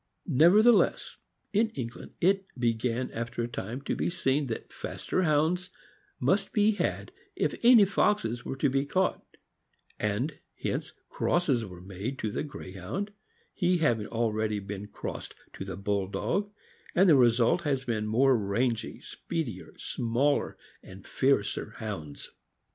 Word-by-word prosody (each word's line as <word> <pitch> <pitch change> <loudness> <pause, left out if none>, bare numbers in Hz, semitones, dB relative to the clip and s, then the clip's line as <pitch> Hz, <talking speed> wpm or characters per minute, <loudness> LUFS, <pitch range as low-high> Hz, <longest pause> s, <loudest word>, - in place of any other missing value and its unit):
Never 170 +8 +6
theless, 240 -2 +3 0.4
in 220 +2 +3
England, 120 -3 -6
it 195 +2 +3
began 120 +1 0
after 115 +1 -3
a - - -1
time 120 +2 -5
to - - -1
be - - 0
seen 145 -5 0
that 115 - -6
faster - - -2
Hounds 165 +3 +2 0.5
must - - +1
be 210 -2 +4
had 210 - -2 0.2
if - - 0
any 235 -3 +8
foxes 180 - +1
were - - -4
to 140 +2 +2
be 135 +1 +1
caught, 185 +6 0 0.8
and 120 +9 -1 0.2
hence - - -3
crosses 140 -10 +1
were 90 -3 -10
made 100 +8 -5
to 110 -3 -2
the - - -2
Greyhound, 135 - -6 0.4
he 180 -1 +2
having 120 -10 +1
already 110 -2 0
been 100 0 -6
crossed - - -7 0.2
to - - -6
the 95 -2 -6
Bulldog, 100 - -1 0.4
and 190 +3 +5
the 160 - +7
result 120 +6 +4
has 135 -5 -1
been 110 -3 -1
more 130 +5 +4
rangy, 110 +2 -1
speedier, 125 - -5
smaller, 125 +5 0 0.2
and 95 +1 -13
fiercer 115 -4 0
Hounds. 95 -10 -6
125 Hz, 140 wpm, -29 LUFS, 105-165 Hz, 0.8 s, any